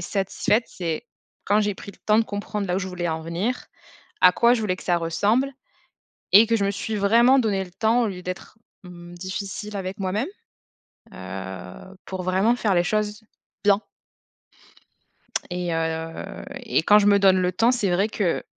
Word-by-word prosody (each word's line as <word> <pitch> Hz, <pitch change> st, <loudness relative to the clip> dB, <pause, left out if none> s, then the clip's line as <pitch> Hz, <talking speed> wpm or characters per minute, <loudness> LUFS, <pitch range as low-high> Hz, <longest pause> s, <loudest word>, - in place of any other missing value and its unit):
satisfaite, 195 Hz, +5 st, 0 dB
c'est 170 Hz, +5 st, -4 dB, 0.4 s
quand 205 Hz, +1 st, +3 dB
j'ai 205 Hz, -1 st, 0 dB
pris 200 Hz, -, -10 dB
le -, -, -22 dB
temps 215 Hz, 0 st, +4 dB
de -, -, +5 dB
comprendre, 205 Hz, 0 st, -4 dB
là 180 Hz, -, 0 dB
où -, -, +1 dB
je 190 Hz, -, -3 dB
voulais 175 Hz, -1 st, -3 dB
en 160 Hz, 0 st, -2 dB
venir, 180 Hz, +10 st, -3 dB, 0.6 s
à 180 Hz, -, +8 dB
quoi 235 Hz, +4 st, +4 dB
je 230 Hz, -, -2 dB
voulais 195 Hz, -4 st, 0 dB
que -, -, -11 dB
ça 175 Hz, -1 st, +2 dB
ressemble 205 Hz, +11 st, +1 dB, 0.8 s
et 210 Hz, +4 st, +8 dB
que 230 Hz, 0 st, +2 dB
je 200 Hz, -, 0 dB
me 200 Hz, -, +1 dB
suis 210 Hz, +2 st, -3 dB
vraiment 235 Hz, +6 st, +5 dB
donné 210 Hz, -6 st, +1 dB
le 180 Hz, -, -14 dB
temps 220 Hz, +6 st, +2 dB
au 230 Hz, -, +1 dB
lieu 180 Hz, -2 st, -7 dB
d'être, 185 Hz, +4 st, -7 dB, 0.3 s
mmh, 175 Hz, -1 st, -11 dB
difficile 195 Hz, +3 st, -5 dB
avec 190 Hz, +1 st, -5 dB
moi-même, 195 Hz, -, -1 dB, 0.9 s
heu, 95 Hz, -, -8 dB
pour 190 Hz, -1 st, -5 dB
vraiment 190 Hz, +6 st, +2 dB
faire 210 Hz, -5 st, +1 dB
les 175 Hz, 0 st, +3 dB
choses 210 Hz, +2 st, -1 dB, 0.4 s
bien 200 Hz, 0 st, +4 dB, 1.7 s
et 175 Hz, -1 st, -2 dB
heu 160 Hz, -, -4 dB, 0.2 s
et -, -, +1 dB
quand 210 Hz, +4 st, +6 dB
je 205 Hz, -, +2 dB
me 200 Hz, -1 st, +5 dB
donne 190 Hz, -1 st, +5 dB
le 180 Hz, 0 st, +1 dB
temps, 230 Hz, +7 st, +3 dB
c'est 225 Hz, -7 st, 0 dB
vrai 190 Hz, +4 st, +2 dB
que 195 Hz, -6 st, -1 dB
195 Hz, 185 wpm, -24 LUFS, 180-215 Hz, 1.7 s, à